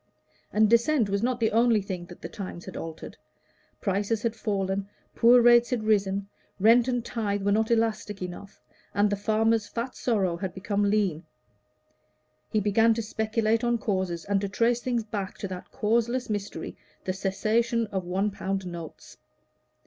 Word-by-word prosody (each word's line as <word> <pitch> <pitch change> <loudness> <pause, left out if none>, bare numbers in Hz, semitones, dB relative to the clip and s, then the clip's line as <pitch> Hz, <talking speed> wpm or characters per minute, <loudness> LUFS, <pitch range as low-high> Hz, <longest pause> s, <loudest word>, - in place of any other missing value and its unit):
And 215 0 +4
Dissent 235 +1 +3
was 200 0 0
not 245 +1 0
the 225 -2 +2
only 230 0 +4
thing 185 -3 -5
that 175 - -13
the - - -3
times 185 -3 -7
had - - -9
altered; 165 -1 -7 0.6
prices 205 +2 -1
had 230 -1 0
fallen, 195 -2 -2 0.2
poor 240 +1 +6
rates 240 0 +6
had 245 -4 -1
risen, 200 -2 +1 0.3
rent 230 +4 +5
and 245 -2 -1
tithe 205 -5 -2
were 200 - +2
not 220 +2 +2
elastic 220 -3 0
enough, 185 +2 -8 0.4
and 205 0 +3
the - - +2
farmer's 220 +1 +1
fat 240 +2 -4
sorrow 195 -8 0
had 190 0 -5
become 200 +1 0
lean; 195 -6 +1 1.3
he 215 - +1
began 225 +3 +3
to 230 - -2
speculate 220 +1 0
on 240 0 +2
causes, 185 -6 -2
and 200 -1 +1
to 200 - -2
trace 235 +4 +1
things 240 -2 -1
back 205 -3 -5
to 200 - -4
that 185 -1 -7
causeless 235 +2 0
mystery, 205 -1 -4 0.3
the 185 - -1
cessation 225 +5 0
of 190 -2 -2
one 190 +4 -1
pound 195 -1 -3
notes. 170 -3 -9
210 Hz, 165 wpm, -27 LUFS, 195-230 Hz, 1.3 s, poor